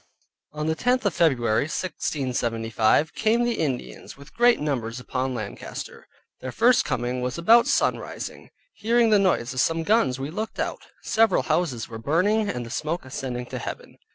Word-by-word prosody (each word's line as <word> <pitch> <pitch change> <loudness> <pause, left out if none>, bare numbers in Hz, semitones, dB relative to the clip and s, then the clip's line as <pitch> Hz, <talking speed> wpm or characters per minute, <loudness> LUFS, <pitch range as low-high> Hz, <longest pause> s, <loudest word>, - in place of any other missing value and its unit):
On 150 0 -4
the 160 - +1
tenth 250 +8 0
of 200 - +2
February 125 -7 +2
1675, 125 -6 0
came 225 +2 +2
the 240 -1 -1
Indians 135 -4 -4
with 140 +1 -15
great 240 0 +4
numbers 125 -5 -2
upon 130 0 -3
Lancaster: - - -7 0.3
their 130 - -6
first 240 - +4
coming 125 +1 -2
was 125 +3 -3
about 230 +8 +5
sunrising; - - -2 0.2
hearing 230 0 +2
the 210 - +6
noise 170 -11 +1
of 130 - -3
some 165 +4 +1
guns, 160 - +2
we 140 +3 -4
looked 220 +6 -5
out; - - -3 0.2
several 225 -4 +3
houses 130 -11 -1
were 115 -1 -8
burning, 200 - +1
and 125 -1 -3
the 115 - -9
smoke 155 +3 -3
ascending 125 -2 -5
to - - -6
heaven. - - -8
150 Hz, 165 wpm, -24 LUFS, 125-210 Hz, 0.3 s, the